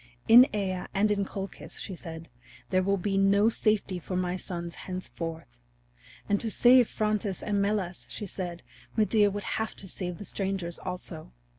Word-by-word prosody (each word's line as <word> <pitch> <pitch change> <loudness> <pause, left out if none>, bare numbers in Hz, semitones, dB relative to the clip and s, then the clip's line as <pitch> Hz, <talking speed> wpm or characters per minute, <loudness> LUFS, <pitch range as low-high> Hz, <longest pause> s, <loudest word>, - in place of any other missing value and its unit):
"In 245 +3 +10
Aea 190 -3 -2
and 210 +2 +3
in 200 -1 +1
Colchis," 195 0 -6
she 190 - -5
said, 165 -1 -8 0.4
"there 185 -1 +4
will 200 +1 +1
be 195 +1 0
no 200 +2 +5
safety 210 -4 +1
for 180 +2 -5
my 180 0 0
sons 170 -2 -5 0.2
henceforth." 165 - -6 0.7
And 205 0 +2
to 225 - -1
save 245 +2 +6
Phrontis 210 -3 -1
and 205 -1 +1
Melas, 200 -3 -1
she 210 - -4
said, 175 -2 -5 0.3
Medea 215 -1 +4
would 205 0 -4 0.2
have 220 - -3
to 195 - -8
save 180 -1 -4
the 205 - -8
strangers 190 -2 -3
also. 180 - -7
195 Hz, 165 wpm, -28 LUFS, 180-210 Hz, 0.7 s, In